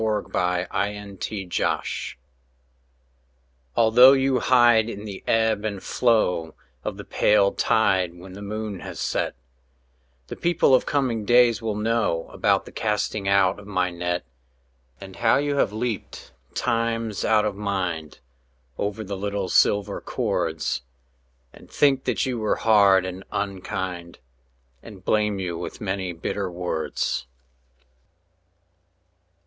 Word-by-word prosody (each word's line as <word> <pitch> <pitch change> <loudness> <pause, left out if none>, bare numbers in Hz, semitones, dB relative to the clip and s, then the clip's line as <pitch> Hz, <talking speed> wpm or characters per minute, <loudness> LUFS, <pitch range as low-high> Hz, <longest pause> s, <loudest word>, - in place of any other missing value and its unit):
BREASAL 110 -1 -1
THE 95 +2 -2
FISHERMAN 90 - 0 1.9
Although 120 +4 +7
you 135 -1 +2
hide 120 -3 +4
in 105 -1 -7
the 100 -3 -8
ebb 110 -2 +2
and 100 -3 -4
flow 105 -9 +1 0.3
Of - - -4
the - - -7
pale 100 -1 +3
tide 95 -6 +1
when 90 +1 -11
the 100 - -9
moon 105 -1 -5
has - - -8
set, - - -1 0.9
The - - -7
people 170 -5 +2
of 130 - +4
coming 125 -6 0
days 120 +1 +4
will 110 -2 -2
know 105 -6 -1
About - - +1
the - - -11
casting 105 -1 -2
out 100 -1 +3
of 105 - -13
my 90 -3 0
net, 85 -3 -3 0.7
And 95 -1 -11
how 115 -1 +3
you 145 0 0
have 105 - +2
leaped 110 0 -5 0.2
times 115 -2 -1
out 110 -1 +3
of 105 -2 -2
mind 90 -6 -3 0.6
Over 105 +2 -2
the 100 -1 -5
little 100 -1 -3
silver 100 +2 +2
cords, 70 - -2 0.7
And - - -16
think 135 -2 +2
that 120 -6 0
you 125 -3 -2
were 110 -1 +1
hard 100 -4 +4
and 95 +1 -6
unkind, 95 -3 -4 0.6
And 100 -5 -13
blame 105 -1 +1
you 90 -3 -4
with 85 - -6
many 95 -2 -3
bitter 90 +3 -3
words. 85 -7 -3
105 Hz, 130 wpm, -24 LUFS, 95-115 Hz, 1.9 s, Although